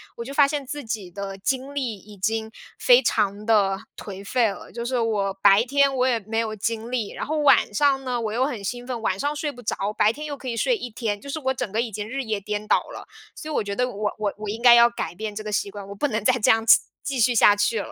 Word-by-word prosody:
我 235 - -6
就 275 - -8
发 280 0 +5
现 285 -1 -3
自 290 +2 -6
己 210 -5 -5
的 195 +1 -6
精 265 +7 -3
力 250 -7 -2
已 205 +2 -15
经 220 +3 -1 0.3
非 250 +1 +6
常 210 -3 0
地 200 -4 +3 0.2
颓 195 -1 -8
废 240 +3 +2
了。 195 - -9
就 235 0 -5
是 255 +1 -1
我 205 -4 0
白 195 +2 +6
天 280 +2 +2
我 255 -1 +1
也 240 -3 +1
没 225 +3 -2
有 220 -1 -2
精 225 +2 -3
力， 240 -5 -2
然 - - -5
后 310 +1 -2
晚 275 -7 +4
上 270 +2 +2
呢 245 -1 -1
我 220 -2 -2
又 250 +4 +1
很 235 -8 -4
兴 245 +4 -5
奋， 240 -3 -4
晚 190 -3 -1
上 290 +1 -1
睡 295 0 -2
不 245 - -13
着， 225 - -2 0.2
白 210 - +4
天 300 +2 -7
又 285 -2 -5
可 260 - -10
以 235 - -2
睡 480 - +1
1 250 - -6
天， 215 -3 -3
就 280 - -11
是 295 - -3
我 265 0 0
整 220 - -4
个 220 +4 0
已 235 -2 -4
经 210 +1 -5
日 270 +1 -3
夜 220 -3 -2
颠 210 +1 -4
倒 - - +5
了。 - - -9 0.3
所 310 - -8
以 - - -3
我 - - +1
觉 200 0 -4
得 250 +2 0
我 205 -2 -3
我 210 -2 -2
我 215 - -7
应 225 +3 -5
该 245 -1 +8
要 235 0 +7
改 235 -7 -5
变 210 +2 -5
这 215 - -5
个 215 - -5
习 200 - -1
惯， 200 -1 -9
我 - - -6
不 290 - 0
能 215 -5 -2
再 255 - +4
这 210 - +2
样 225 0 +1
子， 225 - +8 0.2
继 270 -3 -3
续 240 +2 +3
下 205 -2 +6
去 205 +2 +1
了。 - - -8
230 Hz, 305 characters per minute, -24 LUFS, 210-255 Hz, 0.3 s, 该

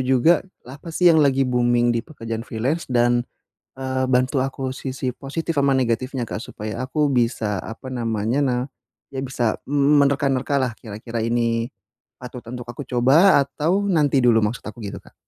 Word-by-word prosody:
juga 130 +6 +4 0.2
apa 140 +7 -11
sih 170 +1 +4
yang 160 - +5
lagi 135 -2 +3
booming 120 -1 +2
di 115 - 0
pekerjaan 115 -5 -6
freelance? 130 +9 -2
Dan, 120 -1 +3 0.6
eee, 130 0 -2
bantu 130 +2 +2
aku 135 0 -4
sisi 130 0 -4
positif 160 +3 -4
sama 140 -1 +3
negatifnya, 125 +1 -1
Kak, 110 - -4
supaya 105 +2 -6
aku 145 +2 0
bisa, 115 -5 0
apa 115 +4 -8
namanya, 115 0 -1
na 125 -2 +1 0.6
ya 135 - -5
bisa 120 -4 -1
m 145 +1 +3
menerka-nerkalah, 135 -2 +1
kira-kira 115 +1 -6
ini 115 0 0 0.5
patut 125 0 -8
untuk 125 -1 -6
aku 120 +4 -6
coba 135 +9 +5
atau 170 +8 0
nanti 150 -7 +3
dulu? 115 -2 +5
Maksud 110 +4 -2
aku 110 +2 -8
gitu, 100 - -6
Kak. - - -20
130 Hz, 160 wpm, -22 LUFS, 120-140 Hz, 0.6 s, yang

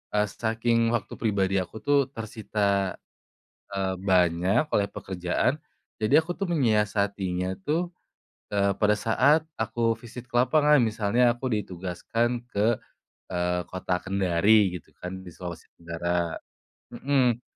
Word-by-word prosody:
eee, 105 - +4 0.2
saking 115 +1 +1
waktu 115 - -4
pribadi 100 -3 +1
aku 95 +4 -6
tuh 140 -2 +3
tersita, 105 -3 -1 0.7
eee, 95 -1 -1 0.2
banyak 90 - +3
oleh 100 0 +2
pekerjaan, 95 - -1 0.4
jadi 110 +4 +1
aku 160 +2 +1
tuh 195 0 -3
menyiasatinya 100 - +1
tuh, 170 - -1 0.5
eee, 100 -1 +1
pada 105 0 +4
saat 135 +9 +3 0.2
aku 115 +1 +1
visit 120 0 -9
ke - - -7
lapangan 150 +3 +4
misalnya 110 +1 +2
aku 125 +1 -3
ditugaskan 110 +5 -2
ke, 110 0 +1 0.5
eee, 90 0 -1
kota 95 -1 -2
Kendari 95 +2 +3
gitu 80 - -25
kan 90 +1 -5
di 90 - -10
Sulawesi 85 -3 -8
Tenggara, 85 0 -2 0.6
mhm. 125 -2 +1
105 Hz, 125 wpm, -26 LUFS, 95-120 Hz, 0.7 s, eee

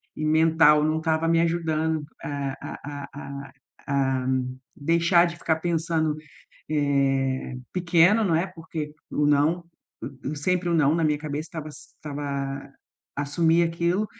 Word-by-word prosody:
e 155 - -3
mental 155 -1 +5
não 155 +1 +1
estava 160 0 0
me 165 0 +3
ajudando 160 -2 0 0.2
a 140 -2 -3
a 145 -1 -7
a - - -14 0.4
a - - -17 0.4
a 135 -2 +1 0.5
deixar 170 +3 +3
de 170 -1 -4
ficar 165 -1 0
pensando, 160 -2 0 0.6
eh, 135 -3 +1 0.2
pequeno, 180 +4 +4
não 170 - +2
é, 165 +4 +2
porque 160 -4 -6 0.2
o 150 - +1
não 150 +4 +2 0.4
e 135 -1 -7
e 155 - -5
sempre 180 +4 0
o 170 - +2
não 150 -1 +4
na 165 -1 +1
minha 150 -1 +2
cabeça 150 +1 -4
estava 155 -1 -6
estava 140 -2 -6 0.4
assumir 160 +4 +2
aquilo, 170 +5 0
155 Hz, 145 wpm, -25 LUFS, 145-170 Hz, 0.6 s, mental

